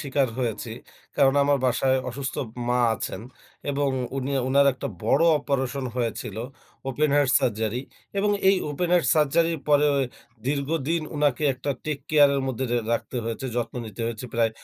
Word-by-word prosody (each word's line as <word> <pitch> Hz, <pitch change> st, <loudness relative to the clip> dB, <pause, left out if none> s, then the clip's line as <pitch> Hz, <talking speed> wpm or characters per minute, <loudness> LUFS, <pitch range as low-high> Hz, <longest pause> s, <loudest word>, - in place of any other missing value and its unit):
স্বীকার 140 Hz, -2 st, +1 dB
হয়েছি। 115 Hz, -2 st, -2 dB, 0.5 s
কারণ 135 Hz, -1 st, +4 dB
আমার 140 Hz, 0 st, +3 dB
বাসায় 130 Hz, +1 st, +2 dB
অসুস্থ 135 Hz, +1 st, -4 dB
ম -, -, -11 dB, 0.2 s
মা 125 Hz, 0 st, +2 dB
আছেন 95 Hz, -, -5 dB, 0.5 s
এবং 140 Hz, 0 st, 0 dB, 0.3 s
উনি, 135 Hz, +1 st, -2 dB, 0.2 s
উনার 140 Hz, +1 st, +5 dB
একটা 125 Hz, -, -5 dB, 0.2 s
বড় 135 Hz, +8 st, +4 dB
অপারেশন 135 Hz, -2 st, -2 dB
হয়েছিল। 115 Hz, -3 st, -3 dB, 0.5 s
ওপেন 145 Hz, +3 st, +1 dB
হার্ট 145 Hz, -3 st, +3 dB
সার্জারি 110 Hz, +1 st, 0 dB, 0.4 s
এবং 205 Hz, +1 st, +2 dB, 0.2 s
এই 195 Hz, -, +5 dB
ওপেন 170 Hz, +5 st, -1 dB
হার্ট 170 Hz, -6 st, +3 dB
সার্জারির 160 Hz, +1 st, +2 dB
পরে 145 Hz, 0 st, +5 dB, 0.6 s
দীর্ঘদিন 150 Hz, +3 st, 0 dB
উনাকে 145 Hz, -2 st, +1 dB
একটা 130 Hz, +3 st, -3 dB
টেক 150 Hz, -2 st, -2 dB
কেয়ারের 145 Hz, -2 st, +5 dB
মধ্যে 130 Hz, 0 st, -2 dB
রে 120 Hz, -, +3 dB
রাখতে 115 Hz, +2 st, -2 dB
হয়েছে, 115 Hz, +4 st, -3 dB
যত্ন 120 Hz, -1 st, -2 dB
নিতে 105 Hz, 0 st, -9 dB
হয়েছে 115 Hz, +1 st, -4 dB
প্রায় 115 Hz, -1 st, +3 dB
135 Hz, 155 wpm, -25 LUFS, 125-145 Hz, 0.6 s, উনার